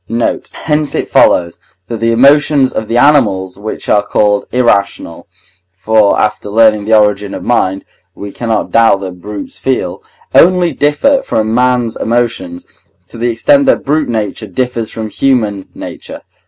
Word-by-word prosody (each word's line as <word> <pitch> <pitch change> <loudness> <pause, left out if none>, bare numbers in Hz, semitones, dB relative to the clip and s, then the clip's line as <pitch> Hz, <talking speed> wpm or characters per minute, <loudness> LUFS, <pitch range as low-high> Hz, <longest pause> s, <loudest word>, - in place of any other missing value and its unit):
Note. 115 +1 -2
Hence 150 -2 -1
it - - -2
follows, 85 -1 +2 0.3
that 115 +1 -6
the 115 +1 +1
emotions 140 +2 +3
of 110 - -4
the 115 - -1
animals 105 -10 +2
which 110 +1 -6
are 105 - +3
called 105 0 0
irrational 100 -8 -1 0.5
(for 105 +2 +2
after 105 -1 -2
learning 110 -1 +3
the 110 +1 +4
origin 105 -1 0
of - - -7
mind 95 -5 -1 0.3
we 100 0 -8
cannot 115 -2 -3
doubt 115 -4 +3
that 90 -2 -8
brutes 105 +1 -8
feel) 95 -8 -2 0.3
only 180 -1 +4
differ 150 - +1
from 110 0 -2
man's 125 -1 +1
emotions, 115 -7 -2 0.4
to - - -12
the 120 +1 0
extent 280 - +2
that - - +1
brute 150 0 0
nature 110 -1 -3
differs 115 +2 -3
from 110 -1 -6
human 110 -6 -1
nature. - - -9
115 Hz, 155 wpm, -12 LUFS, 100-125 Hz, 0.5 s, the